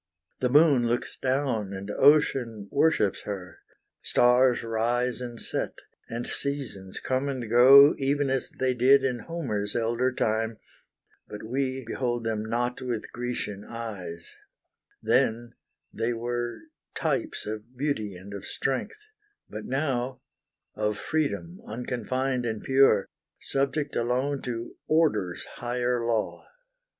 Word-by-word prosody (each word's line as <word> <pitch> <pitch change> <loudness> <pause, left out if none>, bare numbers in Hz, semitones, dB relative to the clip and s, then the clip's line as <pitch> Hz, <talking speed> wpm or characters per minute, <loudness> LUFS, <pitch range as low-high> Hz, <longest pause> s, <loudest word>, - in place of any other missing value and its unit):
The 125 - +1
moon 140 -3 +5
looks 120 +1 -1
down 130 -7 -1
and 100 +1 -5
ocean 125 -7 +3
worships 110 -11 +2
her, 95 -3 -7 0.4
Stars 125 0 +4
rise 120 +3 0
and 120 -2 -6
set, - - -3 0.3
and 120 +1 -4
seasons 130 -10 -4
come 130 +2 -1
and 130 -4 -3
go 135 +5 +8
Even 140 0 +1
as 135 -1 -1
they 130 -1 0
did 130 +3 +5
in 125 -2 0
Homer's 115 -11 -3
elder 120 +2 +1
time, 110 -2 0 0.7
But 105 - -8
we 130 +3 -2
behold 120 0 -2
them 110 -1 -1
not 120 +2 -2
with 120 -4 -4
Grecian 120 -5 -4
eyes: 100 -8 -7 0.7
Then 115 +1 +1 0.4
they 115 +2 -1
were 120 +1 -3 0.3
types 320 -2 -1
of 110 +4 -7
beauty 120 -8 -2
and 95 +3 -10
of 100 - -6
strength, 420 - -3 0.5
But 105 +1 -6
now 130 -2 -1 0.5
of 105 -1 -1
freedom, 160 - -2
unconfined 125 +2 -2
and 110 -2 -3
pure, 135 -7 +4 0.3
Subject 140 +2 -1
alone 130 +4 0
to 120 -1 -5
Order's 110 - +1
higher 120 0 -2
law. 115 -2 -1
120 Hz, 120 wpm, -27 LUFS, 110-135 Hz, 0.7 s, go